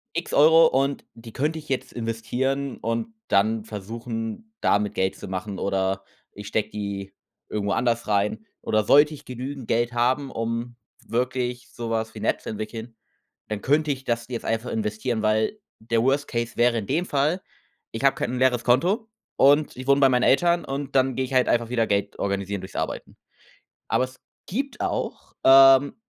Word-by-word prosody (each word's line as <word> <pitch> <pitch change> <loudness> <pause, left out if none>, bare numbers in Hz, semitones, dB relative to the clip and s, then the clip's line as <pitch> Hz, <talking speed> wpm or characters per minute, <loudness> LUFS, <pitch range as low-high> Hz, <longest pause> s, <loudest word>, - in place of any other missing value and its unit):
X - - -3
Euro 160 +3 +7
und 135 0 0
die 115 -1 -12
könnte 155 +4 -1
ich 155 - -12
jetzt 130 - -2
investieren, 120 +4 -2
und 115 - -3
dann 110 +2 +2
versuchen, 115 - -6
damit 105 0 +1
Geld 95 0 0
zu - - -9
machen." 95 +1 -4
Oder 95 0 -1 0.3
ich 105 0 -10
stecke 110 0 -1
die 100 -2 -5 0.3
irgendwo 100 -1 -1
anders 120 0 0
rein. 105 +1 0 0.2
Oder 110 0 +1
sollte 145 +7 +5
ich 145 0 -12
genügend 130 0 -6
Geld 120 +1 +1
haben, 130 +4 +1
um 115 +1 -3 0.3
wirklich 125 +1 -2
so 120 -1 -5
was 110 0 -2
wie - - -8
'ne - - -1
App - - +1
zu - - -6
entwickeln, 110 +2 -6 0.5
dann 105 -1 -4
könnte 150 +2 +2
ich 135 -1 -2
das 115 -1 -1
jetzt 120 -3 -5
einfach 115 +2 -2
investieren, 110 +1 -2
weil 110 - +1 0.2
der 115 +1 0
Worst 140 +3 +1
Case 115 0 -3
wäre 120 0 +3
in 105 - -4
dem 165 - 0
Fall, 150 +5 +1 0.5
ich 115 +4 -5
habe 140 - +5
kein - - -2
'n 125 - -2
leeres 125 -2 +2
Konto 180 - +2 0.3
und 145 +2 +4
ich 130 0 -7
wohne 140 0 +4
bei 135 - +7
meinen 125 -1 +2
Eltern 170 +4 +3
und 140 0 -5
dann 130 -1 +2
gehe 130 - 0
ich 130 - -5
halt 130 -1 +4
einfach 120 -1 +1
wieder 115 -2 +1
Geld 100 -1 -1
organisieren 100 0 -2
durchs 95 - -9
Arbeiten. - - -4 0.7
Aber 115 +3 +2
es 130 0 -15 0.3
gibt 275 +8 -3
auch, - - -3
ähm, 135 +1 +7
120 Hz, 185 wpm, -24 LUFS, 110-135 Hz, 0.7 s, Euro